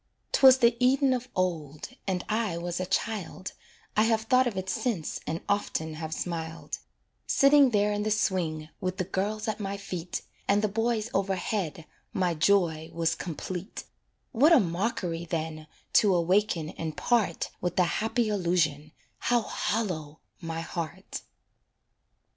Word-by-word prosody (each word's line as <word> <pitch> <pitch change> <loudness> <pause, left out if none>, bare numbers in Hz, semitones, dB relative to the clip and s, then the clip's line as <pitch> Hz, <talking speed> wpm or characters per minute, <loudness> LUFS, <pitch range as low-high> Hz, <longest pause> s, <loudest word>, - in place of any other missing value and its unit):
'Twas 265 -1 +8
the 235 -2 +4
Eden 260 +1 +4
of 250 0 -3
old, 160 -6 -2 0.2
and 185 -2 -1
I 215 -5 0
was 175 +1 -3
a 185 - -2
child 195 -2 -2 0.4
(I 215 - +4
have 225 -1 +2
thought 255 +2 +4
of 215 -5 -3
it 190 0 -3
since 220 -6 -2
and 165 +2 -2
often 160 -6 -1
have 160 0 -5
smiled); 165 0 -4 0.5
Sitting 275 -1 +6
there 210 -2 +2
in 205 - -1
the 215 - 0
swing, 170 -7 0
with 185 0 -2
the 185 - 0
girls 210 +4 -2
at 215 0 -2
my 200 -1 -3
feet, 180 -3 -5 0.2
And 205 +1 +3
the - - +4
boys 225 +1 -1
overhead 190 -4 -1 0.3
my 180 -2 +1
joy 165 -2 +2
was 165 -1 +1
complete; 180 +4 -5 0.5
What 285 +7 +5
a 330 - +8
mockery, 175 -3 -1
then, 160 -2 -4 0.3
to 200 -4 +5
awaken 175 -2 +2
and 160 -2 -5
part 235 -4 +1
With 180 - -1
the 185 - +4
happy 220 +6 0
illusion 170 -7 0 0.3
how 240 -1 +2
hollow 165 -12 -2 0.2
my 165 -1 -4
heart! 165 -2 -5
190 Hz, 150 wpm, -28 LUFS, 165-220 Hz, 0.5 s, Twas